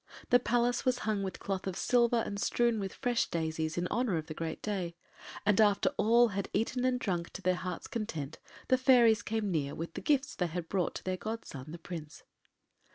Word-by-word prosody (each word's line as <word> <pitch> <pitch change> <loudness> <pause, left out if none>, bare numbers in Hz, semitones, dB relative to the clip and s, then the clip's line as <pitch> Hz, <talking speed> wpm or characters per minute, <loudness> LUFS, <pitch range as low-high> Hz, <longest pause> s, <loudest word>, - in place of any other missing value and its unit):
The 245 - +7
Palace 245 0 +1
was 255 -1 +2
hung 215 -2 0
with 190 -1 -4
cloth 195 -1 -3
of 190 - -2
silver 235 0 +3
and 200 0 -4
strewn 235 -2 +2
with 195 -1 -3
fresh 245 -2 0
daisies, 160 -1 -2
in 175 - 0
honour 235 -8 +1
of 155 - -3
the 155 - -6
great 160 +1 -4
day, 185 -5 -2 0.5
and 210 +1 +4
after 205 -2 +4
all 235 +2 +5
had 200 -1 -3
eaten 230 +4 0
and 255 -1 +2
drunk 175 -7 -2
to 190 - -7
their 185 - +3
hearts’ 180 -1 -4
content 165 -10 -4 0.3
the 255 - +3
fairies 245 -4 +6
came 220 -2 -1
near 145 -4 -1
with 165 +1 -5
the - - -5
gifts 275 -2 +1
they 180 - -1
had 170 0 -4
brought 185 -3 0
to - - -6
their 185 0 -2
godson 170 - -6
the 170 - -6
Prince. 165 -3 -8
200 Hz, 210 wpm, -31 LUFS, 170-235 Hz, 0.5 s, The